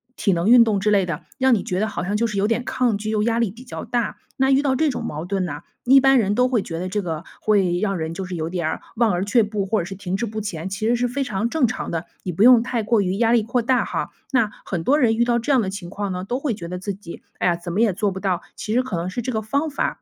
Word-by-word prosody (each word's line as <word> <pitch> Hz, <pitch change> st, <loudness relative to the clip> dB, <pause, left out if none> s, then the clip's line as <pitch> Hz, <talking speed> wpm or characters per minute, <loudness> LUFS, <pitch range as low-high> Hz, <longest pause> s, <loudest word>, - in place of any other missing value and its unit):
体 200 Hz, -, +1 dB
能 175 Hz, +1 st, 0 dB
运 245 Hz, -1 st, +9 dB
动 215 Hz, -3 st, +1 dB
之 210 Hz, +2 st, +1 dB
类 195 Hz, -3 st, +3 dB
的， 160 Hz, -3 st, -4 dB, 0.2 s
让 260 Hz, -2 st, +5 dB
你 205 Hz, -, -2 dB
觉 185 Hz, -, -2 dB
得 215 Hz, -, +1 dB
好 180 Hz, -, -4 dB
像 200 Hz, +3 st, -2 dB
就 230 Hz, +2 st, +1 dB
是 210 Hz, -, -4 dB
有 200 Hz, +1 st, +2 dB
点 230 Hz, +2 st, 0 dB
抗 250 Hz, -5 st, 0 dB
拒 215 Hz, -, -4 dB
又 215 Hz, -1 st, +1 dB
压 230 Hz, +1 st, +1 dB
力 230 Hz, -4 st, +1 dB
比 235 Hz, +6 st, -12 dB
较 245 Hz, -, -7 dB
大。 240 Hz, -2 st, -1 dB, 0.2 s
那 265 Hz, 0 st, +3 dB
遇 270 Hz, +1 st, +4 dB
到 275 Hz, -2 st, +1 dB
这 310 Hz, +3 st, +2 dB
种 260 Hz, -, -3 dB
矛 155 Hz, +3 st, -4 dB
盾 195 Hz, 0 st, -1 dB
呢， 175 Hz, -, -5 dB, 0.2 s
一 270 Hz, +2 st, +7 dB
般 270 Hz, 0 st, +5 dB
人 205 Hz, -4 st, +2 dB
都 250 Hz, +3 st, +3 dB
会 240 Hz, -5 st, +1 dB
觉 165 Hz, -3 st, -5 dB
得 185 Hz, -, -3 dB
这 205 Hz, +3 st, -1 dB
个 165 Hz, -2 st, -4 dB, 0.2 s
会 190 Hz, -5 st, +2 dB
让 195 Hz, -2 st, 0 dB
人 160 Hz, 0 st, -3 dB
就 190 Hz, -, -5 dB
是 185 Hz, -1 st, -5 dB
有 160 Hz, 0 st, -3 dB
点 170 Hz, -3 st, -1 dB
儿 -, -, -4 dB
望 225 Hz, -2 st, +3 dB
而 180 Hz, +2 st, -1 dB
却 225 Hz, +3 st, +3 dB
步， 210 Hz, -1 st, -2 dB
或 215 Hz, +2 st, +1 dB
者 170 Hz, -, -5 dB
是 195 Hz, -, -7 dB
停 185 Hz, -1 st, -4 dB
滞 215 Hz, -, -1 dB
不 220 Hz, 0 st, -5 dB
前， 190 Hz, -4 st, -4 dB
其 210 Hz, +3 st, -2 dB
实 240 Hz, -, +3 dB
是 245 Hz, +1 st, 0 dB
非 270 Hz, +3 st, -2 dB
常 210 Hz, 0 st, -1 dB
正 300 Hz, -4 st, +2 dB
常 220 Hz, -, -4 dB
的， 165 Hz, 0 st, -3 dB, 0.2 s
你 180 Hz, -, -3 dB
不 175 Hz, +4 st, -3 dB
用 240 Hz, -1 st, +8 dB
太 245 Hz, -2 st, -1 dB
过 220 Hz, 0 st, +2 dB
于 190 Hz, 0 st, -1 dB
压 230 Hz, +1 st, +3 dB
力 230 Hz, -, +4 dB
扩 240 Hz, +3 st, 0 dB
大 250 Hz, +2 st, +2 dB
哈。 -, -, -3 dB, 0.2 s
那 235 Hz, -6 st, +3 dB
很 175 Hz, -4 st, -3 dB
多 290 Hz, +3 st, +4 dB
人 225 Hz, -6 st, +3 dB
遇 235 Hz, -, +3 dB
到 240 Hz, 0 st, +2 dB
这 235 Hz, +5 st, -1 dB
样 260 Hz, -4 st, +4 dB
的 190 Hz, -, -2 dB
情 190 Hz, -3 st, -7 dB
况 200 Hz, 0 st, -3 dB
呢， 180 Hz, -, -4 dB
都 240 Hz, +7 st, -2 dB
会 275 Hz, -4 st, -1 dB
觉 170 Hz, -5 st, -7 dB
得 180 Hz, -, -4 dB
自 200 Hz, +2 st, -3 dB
己 185 Hz, -3 st, -10 dB, 0.2 s
“哎 -, -, +2 dB
呀， 170 Hz, -, +2 dB
怎 170 Hz, 0 st, -6 dB
么 205 Hz, -, +1 dB
也 225 Hz, -4 st, +4 dB
做 200 Hz, +2 st, -1 dB
不 190 Hz, -, -6 dB
到”， 190 Hz, -3 st, 0 dB
其 215 Hz, -, -5 dB
实 250 Hz, -, +4 dB
可 255 Hz, -7 st, -4 dB
能 170 Hz, +2 st, -2 dB
是 240 Hz, -, -3 dB
这 250 Hz, +1 st, -3 dB
个 220 Hz, -, 0 dB
方 280 Hz, +8 st, -1 dB
法 285 Hz, -, -2 dB
210 Hz, 345 characters per minute, -22 LUFS, 185-240 Hz, 0.2 s, 运